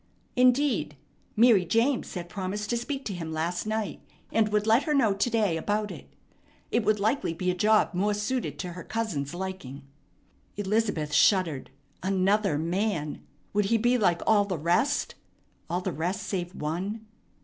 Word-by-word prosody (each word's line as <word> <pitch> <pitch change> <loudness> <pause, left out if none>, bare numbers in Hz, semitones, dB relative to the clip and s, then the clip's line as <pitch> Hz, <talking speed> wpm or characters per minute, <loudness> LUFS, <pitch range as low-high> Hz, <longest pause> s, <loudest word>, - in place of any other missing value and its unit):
Indeed, 255 +3 +2 0.4
Mary 225 -4 +6
James 230 +8 +1
had 175 -1 -4
promised 200 +3 -4
to 240 - +1
speak 270 +3 -4
to 200 - -3
him 165 -3 -5
last 170 +5 -2
night, 215 -1 -2 0.3
and 220 -1 +2
would 210 0 +1
let 225 +4 +4
her 300 -2 +1
know 230 -7 +4
to 200 +5 0
day 210 -7 +1
about 210 +5 -1
it. - - -11 0.6
It 235 - +2
would 210 0 +2
likely 220 -4 0
be 180 +2 0
a - - -1
job 210 +3 +3
more 205 +3 +1
suited 210 - -2
to 175 +4 -5
her 175 0 -8
cousin's 175 -10 -3
liking. 175 -8 -6 0.7
Elizabeth 205 -7 0
shuddered. 165 -4 +3 0.3
Another 195 -2 +2
man! 170 -1 -1 0.3
Would 205 0 +2
he 225 +3 +3
be 240 +3 +2
like 180 -8 +2
all 205 -2 +4
the 190 -3 -3
rest? 170 - +1 0.6
all 175 +2 -1
the 185 -1 -3
rest 175 +6 -2
save 180 -2 -4
one! 190 +9 -3
200 Hz, 165 wpm, -27 LUFS, 175-220 Hz, 0.7 s, Mary